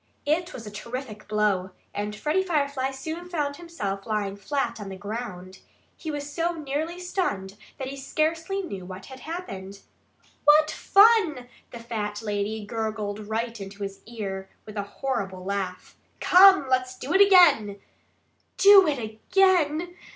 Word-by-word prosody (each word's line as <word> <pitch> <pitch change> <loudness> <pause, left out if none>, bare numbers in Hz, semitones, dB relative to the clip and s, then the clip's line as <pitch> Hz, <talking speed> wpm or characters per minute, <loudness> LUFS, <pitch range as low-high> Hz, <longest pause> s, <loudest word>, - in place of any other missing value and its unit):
It 340 +5 0
was 235 -8 -8
a 210 - -8
terrific 220 +1 -7
blow. 205 -3 0 0.2
And 210 +1 -3
Freddie 300 - +1
Firefly 280 -6 0
soon 320 +6 -6
found 290 -5 -2
himself 205 - -5
lying 210 -2 -1
flat 220 +6 -2
on 200 - -6
the 190 - -6
ground. 190 -3 -7 0.4
He 320 - -7
was 290 -1 -4
so 335 +3 -1
nearly 315 +3 -3
stunned 210 - -2 0.2
that 265 - -4
he 275 - -6
scarcely 325 +7 -1
knew 195 - -6
what 185 +1 -9
had 265 -1 -11
happened. 200 - -7 0.6
"What 305 +1 +6
fun!" 395 - +4 0.2
the - - -9
fat 220 -2 -4
lady 210 0 -2
gurgled 215 -1 -4
right 230 0 -3
in 195 - -6
his 200 -1 -7
ear, 195 -4 -5 0.2
with 215 - -10
a 205 - -1
horrible 200 -4 -4
laugh. 190 -2 -4 0.2
"Come! 380 -5 +7
Let's 255 0 0
do 270 +6 -4
it 385 - +6
again!" 300 - +6 0.8
"Do 395 -2 +8
it 295 -2 +1
again!" 335 - +1
245 Hz, 150 wpm, -26 LUFS, 205-320 Hz, 0.8 s, Do